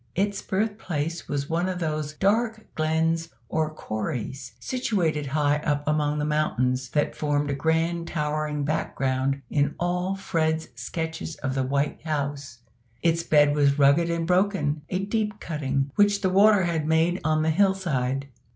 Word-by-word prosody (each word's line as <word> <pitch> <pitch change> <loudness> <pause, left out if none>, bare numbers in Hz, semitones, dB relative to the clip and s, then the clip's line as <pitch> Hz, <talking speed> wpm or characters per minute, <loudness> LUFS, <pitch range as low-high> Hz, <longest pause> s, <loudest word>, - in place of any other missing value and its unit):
Its 200 +1 0
birthplace 185 -6 -2
was 140 -1 -2
one 170 +3 0
of 185 - -2
those 155 -3 -2
dark 220 +5 +1
glens 160 +1 0 0.2
or 155 -1 0
"corries" 120 -1 -4
situated 170 - -1
high 145 +1 +2
up 145 -1 -1
among 150 -1 +1
those 150 0 -1
mountains 130 -4 0
that 150 +3 0
formed 145 -1 0
a - - 0
grand 165 +3 0
towering 150 -1 -1
background 135 -2 -1
in 145 -1 +1
all 180 +2 0
Fred's 160 -5 -1
sketches 160 +7 -4
of 130 -1 -1
the 135 - 0
White 140 +2 -1
House. 140 -5 -4 0.4
Its 165 0 +3
bed 150 -3 +4
was 140 -1 +3
rugged 145 +4 +4
and 170 -1 -1
broken 180 -4 +1
a 190 +1 -1
deep 210 0 -1
cutting, 140 -3 -2
which 205 -1 +3
the 190 -2 +1
water 200 +1 +6
had 165 -3 -1
made 165 +3 +2
on 155 0 +2
the 160 - +2
hill 190 +3 +3
side. 135 -7 -1
155 Hz, 155 wpm, -25 LUFS, 145-175 Hz, 0.4 s, water